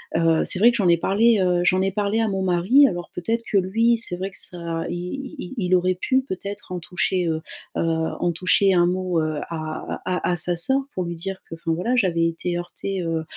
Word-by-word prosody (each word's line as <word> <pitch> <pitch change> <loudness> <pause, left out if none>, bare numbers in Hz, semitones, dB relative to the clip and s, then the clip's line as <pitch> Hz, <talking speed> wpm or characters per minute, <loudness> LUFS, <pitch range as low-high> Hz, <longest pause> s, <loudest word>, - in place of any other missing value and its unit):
Heu, 165 -1 +3
c'est 185 - +2
vrai 235 +3 +7
que 235 - -2
j'en 195 -5 +2
ai 170 - +6
parlé, 215 +6 +3
heu, 180 -1 +2
j'en 185 +1 +3
ai 195 - +1
parlé 205 +2 0
à 225 - +1
mon 195 -1 -2
mari 190 +10 +4
alors, 175 -3 -2
peut-être, 230 +6 -2
que 205 - +3
lui 225 +5 +2
c'est 220 -6 -3
vrai 190 +2 -4
que 185 - -11
ça 170 -2 -4
i 175 - -3
i 245 +10 -6
i 180 - -6
il 185 - +3
aurait 185 0 +2
pu 260 +5 +2
peut-être 200 -5 -7
en 180 - -3
toucher, 180 +1 -1
heu 160 -1 -1 0.4
heu, - - +1
en 165 +1 0
toucher 185 +3 +3
un 175 -1 +5
mot, 180 -1 0
heu, 155 -1 -2
à 155 -2 -5
à 180 -1 -1
à - - +1
sa 175 +1 +1
sœur 265 +11 +2
pour 185 - -2
lui 170 0 -4
dire 190 +3 -5
que, - - -6
enfin 165 0 -3
voilà 185 +10 0
j'avais 170 -8 +2
été 175 +1 -3
heurtée, 190 +2 -5
heu 165 -2 -2
180 Hz, 240 wpm, -23 LUFS, 170-200 Hz, 0.4 s, vrai